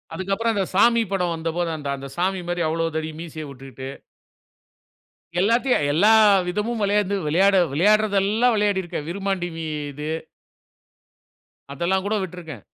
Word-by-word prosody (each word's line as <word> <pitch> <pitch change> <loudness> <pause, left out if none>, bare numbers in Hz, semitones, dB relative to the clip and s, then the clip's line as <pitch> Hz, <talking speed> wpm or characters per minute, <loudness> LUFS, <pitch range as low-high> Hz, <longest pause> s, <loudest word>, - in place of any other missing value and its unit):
அதுக்கப்பறம், 200 +5 -1
அந்த 195 -2 +1
சாமி 235 +4 +5
படம் 180 -3 0
வந்தபோது, 165 +1 -2
அந்த 145 -2 -5
அந்த 135 0 -8
சாமி 185 +1 0
மாரி, 175 0 -1
அவ்வளோ 165 +1 0
தடி 160 0 -3
மீசைய 160 -2 -7
வுட்டுக்கிட்டு. 135 -1 -9 1.5
எல்லாத்தையும், 230 - +2
எல்லா 205 +9 +5 0.4
விதமும் 210 +5 -2
விளையாந்து 200 0 +1
விளையாட 190 +6 +4 0.2
விளையாடுறதெல்லாம், 210 - +3
விளையாடிருக்கேன். 190 -7 -1
விருமாண்டி 195 -1 -2
வி 165 - -5 0.3
இது. 150 +2 -5 1.6
அதெல்லாம் 185 +6 0
கூட 210 - 0
விட்டிருக்கேன். 165 - -8
185 Hz, 120 wpm, -23 LUFS, 160-205 Hz, 1.6 s, சாமி